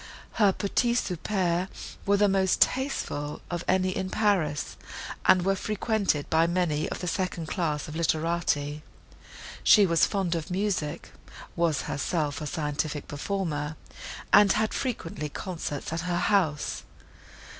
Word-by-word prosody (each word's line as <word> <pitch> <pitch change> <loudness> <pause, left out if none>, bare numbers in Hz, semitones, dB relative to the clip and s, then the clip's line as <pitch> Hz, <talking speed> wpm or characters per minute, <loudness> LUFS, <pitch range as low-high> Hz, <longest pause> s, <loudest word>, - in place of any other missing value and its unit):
Her 205 -4 +4
petits 235 +5 +1
soupers 180 -1 -1 0.4
were 200 0 +4
the 205 0 +4
most 190 -1 +2
tasteful 200 - 0
of 175 0 -2
any 185 0 +2
in 190 - -2
Paris, 185 -10 0 0.5
and 185 -1 +6
were 195 - +3
frequented 205 -6 0
by 160 +1 +3
many 170 -4 0
of - - -5
the 180 - -3
second 180 -2 -2
class 155 -4 -1
of 150 - -7
literati. 160 -3 0 0.8
She 210 -2 +7
was 170 -3 +3
fond 190 -4 -1
of 165 -2 -3
music, 180 -5 -2 0.4
was 170 -3 +1
herself 145 -1 -2
a 150 - -3
scientific 150 0 -2
performer, 150 -2 -3 0.6
and 205 -2 +8
had 215 0 0
frequently 165 - -3
concerts 160 -3 -5
at 165 - -2
her 175 0 -1
house. 175 -7 +1
175 Hz, 135 wpm, -27 LUFS, 155-195 Hz, 0.8 s, and